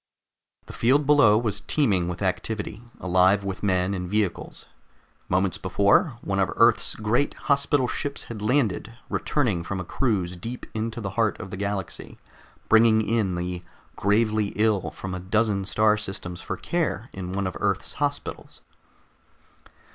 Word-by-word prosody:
The -, -, -10 dB
field 140 Hz, +5 st, +3 dB
below 140 Hz, -8 st, +6 dB
was 110 Hz, -3 st, -1 dB
teeming 100 Hz, -, +1 dB
with 90 Hz, +2 st, -4 dB
activity, 105 Hz, +3 st, -3 dB, 0.2 s
alive 95 Hz, +2 st, +3 dB
with 95 Hz, -1 st, -4 dB
men 95 Hz, -1 st, +1 dB
and 90 Hz, -2 st, -4 dB
vehicles. 105 Hz, -2 st, -2 dB, 0.6 s
Moments 95 Hz, +1 st, +1 dB
before, 100 Hz, -, +2 dB
one 95 Hz, 0 st, -2 dB
of 95 Hz, -3 st, +1 dB
Earth's 115 Hz, -1 st, +3 dB
great 110 Hz, +6 st, 0 dB
hospital 140 Hz, -2 st, +1 dB
ships 140 Hz, +2 st, -3 dB
had 110 Hz, -3 st, -8 dB
landed, 115 Hz, -1 st, 0 dB
returning 115 Hz, -, 0 dB
from 95 Hz, +2 st, -4 dB
a -, -, -3 dB
cruise 95 Hz, -7 st, -1 dB
deep 115 Hz, +8 st, -7 dB
into 110 Hz, +1 st, -3 dB
the 95 Hz, -2 st, -4 dB
heart 110 Hz, +1 st, 0 dB
of 95 Hz, -3 st, -8 dB
the -, -, -4 dB
galaxy, 100 Hz, -2 st, -4 dB, 0.5 s
bringing 110 Hz, -1 st, +5 dB
in 105 Hz, -5 st, +1 dB
the 90 Hz, 0 st, -3 dB, 0.3 s
gravely 105 Hz, 0 st, +1 dB
ill 105 Hz, -2 st, +1 dB
from 95 Hz, -1 st, -7 dB
a 90 Hz, -, -4 dB
dozen 100 Hz, +1 st, 0 dB
star 105 Hz, +2 st, +3 dB
systems 90 Hz, -4 st, -5 dB
for -, -, -4 dB
care 165 Hz, -8 st, -2 dB
in 90 Hz, -1 st, -6 dB
one 100 Hz, +1 st, -2 dB
of 95 Hz, -, -3 dB
Earth's -, -, -1 dB
hospitals. -, -, -4 dB
105 Hz, 150 wpm, -25 LUFS, 95-115 Hz, 0.6 s, below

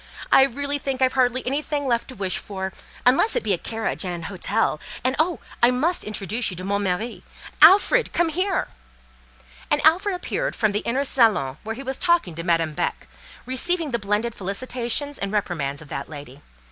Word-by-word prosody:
I -, -, +8 dB
really 285 Hz, +2 st, -2 dB
think 270 Hz, -2 st, -3 dB
I've 260 Hz, -1 st, +3 dB
hardly 255 Hz, -1 st, +1 dB
anything 285 Hz, +2 st, -2 dB
left 235 Hz, -3 st, 0 dB
to 260 Hz, -, -10 dB
wish 190 Hz, -2 st, -1 dB
for—unless 205 Hz, -, 0 dB
it -, -, 0 dB
be 210 Hz, -2 st, +1 dB
a 175 Hz, -, -1 dB
carriage 225 Hz, -2 st, -3 dB
and 180 Hz, -, -3 dB
an 170 Hz, -, -7 dB
hotel, 190 Hz, -3 st, -1 dB, 0.2 s
and, 260 Hz, +2 st, +1 dB
oh! 320 Hz, -2 st, +1 dB, 0.2 s
I—must 250 Hz, +9 st, +2 dB
introduce 215 Hz, +2 st, -1 dB
you 180 Hz, -, -5 dB
to 185 Hz, -, -6 dB
'mon 200 Hz, +1 st, -1 dB
mari.' 200 Hz, +5 st, -2 dB, 0.4 s
Alfred, 450 Hz, +5 st, +6 dB
come 345 Hz, -1 st, +1 dB
here!" 370 Hz, +4 st, -1 dB, 1.0 s
And -, -, +2 dB
Alfred 370 Hz, +5 st, +4 dB
appeared -, -, -3 dB
from 215 Hz, -2 st, +1 dB
the 205 Hz, -, 0 dB
inner 255 Hz, +5 st, -1 dB
salon, 215 Hz, -, +2 dB
where 225 Hz, +1 st, -4 dB
he 270 Hz, -, -7 dB
was 265 Hz, 0 st, -4 dB
talking 345 Hz, -, +2 dB
to 165 Hz, -, -5 dB
Madame 165 Hz, -3 st, +1 dB
Beck, -, -, -3 dB, 0.4 s
receiving 310 Hz, +5 st, 0 dB
the 235 Hz, -, 0 dB
blended 210 Hz, +3 st, -1 dB
felicitations 245 Hz, +7 st, -1 dB
and 200 Hz, 0 st, -3 dB
reprimands 160 Hz, -8 st, -2 dB
of 150 Hz, -, -17 dB
that 140 Hz, -, -5 dB
lady. 145 Hz, -2 st, -10 dB
235 Hz, 185 wpm, -23 LUFS, 195-285 Hz, 1.0 s, I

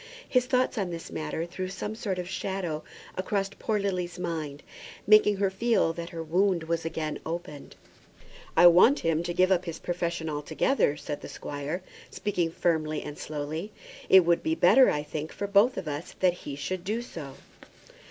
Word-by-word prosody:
His 250 Hz, -1 st, +2 dB
thoughts 255 Hz, -2 st, +1 dB
on 190 Hz, -3 st, -1 dB
this 170 Hz, -1 st, -7 dB
matter 155 Hz, +1 st, -3 dB
threw 185 Hz, +2 st, -5 dB
some 195 Hz, +3 st, -4 dB
sort 210 Hz, -4 st, -3 dB
of 180 Hz, -1 st, -4 dB
shadow 185 Hz, -4 st, -3 dB, 0.3 s
across 195 Hz, +1 st, -1 dB
poor 220 Hz, -2 st, 0 dB
Lily's 185 Hz, -3 st, -2 dB
mind, 160 Hz, -5 st, -4 dB, 0.4 s
making 210 Hz, 0 st, +6 dB
her 195 Hz, -1 st, +1 dB
feel 220 Hz, -4 st, +2 dB
that 170 Hz, 0 st, -6 dB
her 165 Hz, -1 st, -5 dB
wound 180 Hz, +2 st, +2 dB
was 165 Hz, 0 st, -1 dB
again 160 Hz, -1 st, -3 dB
opened. 160 Hz, -3 st, -6 dB, 0.8 s
"I -, -, +8 dB
want 180 Hz, -, +7 dB
him 165 Hz, -1 st, +1 dB
to 175 Hz, 0 st, -3 dB
give 185 Hz, +2 st, +3 dB
up 185 Hz, -1 st, +2 dB
his 165 Hz, -2 st, -5 dB
profession 170 Hz, -2 st, -3 dB
altogether," 150 Hz, -, +1 dB
said 145 Hz, 0 st, -5 dB
the -, -, -8 dB
squire, 145 Hz, +5 st, -5 dB, 0.3 s
speaking 180 Hz, -5 st, -1 dB
firmly 160 Hz, -2 st, 0 dB
and 150 Hz, -, -7 dB
slowly. 155 Hz, +8 st, -5 dB, 0.4 s
"It 190 Hz, -2 st, +8 dB
would 170 Hz, 0 st, +3 dB
be 320 Hz, 0 st, 0 dB
better, 265 Hz, -5 st, +6 dB
I 150 Hz, -, -1 dB
think, 150 Hz, +1 st, -5 dB
for 205 Hz, -, -4 dB
both 205 Hz, +5 st, +4 dB
of 170 Hz, -, -4 dB
us 150 Hz, +2 st, -5 dB
that 180 Hz, -2 st, +4 dB
he 145 Hz, -5 st, -7 dB
should 175 Hz, +5 st, -4 dB
do 220 Hz, +5 st, -2 dB
so." 150 Hz, -, -8 dB
175 Hz, 180 wpm, -28 LUFS, 160-195 Hz, 0.8 s, I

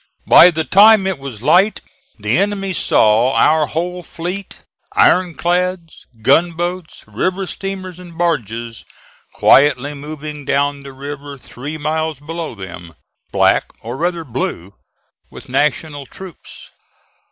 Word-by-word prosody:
By 180 Hz, -, +8 dB
the 160 Hz, -2 st, -2 dB
time 200 Hz, +6 st, +6 dB
it 190 Hz, -5 st, -2 dB
was 130 Hz, -5 st, -8 dB
light 195 Hz, +9 st, +3 dB, 0.4 s
the -, -, -1 dB
enemy 195 Hz, -1 st, -1 dB
saw 115 Hz, -4 st, +3 dB
our 155 Hz, -1 st, +3 dB
whole 180 Hz, +3 st, -3 dB
fleet, 180 Hz, +4 st, -7 dB, 0.3 s
ironclads, 180 Hz, -1 st, +1 dB, 0.2 s
gunboats, 175 Hz, +5 st, 0 dB
river 185 Hz, -, -2 dB
steamers 185 Hz, -1 st, -6 dB
and 175 Hz, -2 st, -12 dB
barges, 120 Hz, -, -2 dB, 0.5 s
quietly 145 Hz, 0 st, +4 dB
moving 150 Hz, 0 st, -8 dB
down 140 Hz, +1 st, 0 dB
the 140 Hz, 0 st, -10 dB
river 140 Hz, +1 st, -8 dB
three 140 Hz, +4 st, -8 dB
miles 155 Hz, -1 st, -2 dB
below 160 Hz, -2 st, -6 dB
them, 85 Hz, -4 st, -10 dB, 0.4 s
black, -, -, +2 dB
or 120 Hz, +2 st, -6 dB
rather 170 Hz, +2 st, -2 dB
blue, 100 Hz, -, -4 dB, 0.6 s
with -, -, -13 dB
National 145 Hz, -1 st, -1 dB
troops. 190 Hz, -4 st, -12 dB
155 Hz, 120 wpm, -17 LUFS, 140-180 Hz, 0.6 s, By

